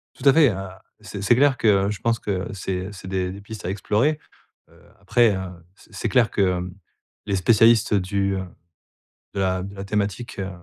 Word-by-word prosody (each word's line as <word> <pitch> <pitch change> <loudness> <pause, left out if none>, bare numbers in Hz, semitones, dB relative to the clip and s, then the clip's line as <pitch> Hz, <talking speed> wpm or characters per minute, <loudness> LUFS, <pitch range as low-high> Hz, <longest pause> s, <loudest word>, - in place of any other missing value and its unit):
Tout - - -2
à 135 - +6
fait. 155 -5 +6
Heu, 95 - -2 0.5
c'est 100 - -7
c'est 115 +4 +4
clair 140 0 +3
que 100 -3 +3
je 105 - -4
pense 115 -1 0
que 95 -3 -3
c'est 95 -1 -4
c'est 95 -1 -10
des 95 -1 -1
des 100 - -10
pistes 105 0 -9
à - - -2
explorer. 105 +9 0 0.5
Heu, - - -22 0.2
après 115 -5 +3
heu, - - -3 0.4
c'est 110 - -21
c'est 110 +3 -2
clair 115 +3 +3
que, - - -2 0.2
hem, 90 0 -6 0.5
les 100 -2 0
spécialistes 115 +3 +4
du, 100 0 0
heu, 95 - -3 0.9
de - - -4
la 95 -1 0
de 100 +1 -8
la 95 0 -7
thématique, 105 +2 -3
heu, 95 0 -3
100 Hz, 205 wpm, -23 LUFS, 95-115 Hz, 0.9 s, à